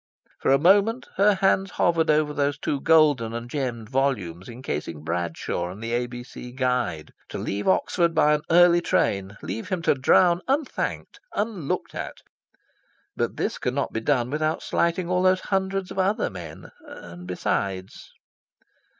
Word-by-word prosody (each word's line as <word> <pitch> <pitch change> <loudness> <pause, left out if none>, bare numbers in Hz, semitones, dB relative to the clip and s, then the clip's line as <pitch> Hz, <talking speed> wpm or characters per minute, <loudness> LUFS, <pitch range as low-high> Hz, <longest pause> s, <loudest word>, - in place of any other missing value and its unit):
For - - 0
a 135 - +6
moment 200 - +3
her 200 +1 +5
hands 195 0 +2
hovered 165 -1 +2
over 150 -1 +2
those 145 -1 0
two 145 - -2
golden 145 -8 +4
and 120 0 -5
gemmed 120 -5 -3
volumes 120 -9 -1
encasing 80 - -5
Bradshaw 85 +1 -3
and 95 +3 -9
the 115 +1 -5
A.B.C. 120 0 -5
Guide. 125 - -1 0.2
To - - -5
leave 100 +1 -3
Oxford 170 -2 +2
by 150 -1 +4
an 150 - +1
early 175 0 +6
train, 100 - 0
leave 115 - -5
him 180 -3 -2
to - - +4
drown 170 +6 +4
unthanked, 275 +2 -2 0.2
unlooked 205 -8 -2
at... - - -6 1.0
But - - -2
this - - -2
could - - -2
not - - -2
be 110 - -2
done 125 -1 +1
without 155 +1 -1
slighting 170 +1 0
all 180 0 +1
those 185 0 +3
hundreds 195 -1 -1
of - - -4
other 195 +3 +1
men... 80 -3 -9
And 85 +1 -11
besides... 95 +1 -3
140 Hz, 155 wpm, -25 LUFS, 110-175 Hz, 1.0 s, a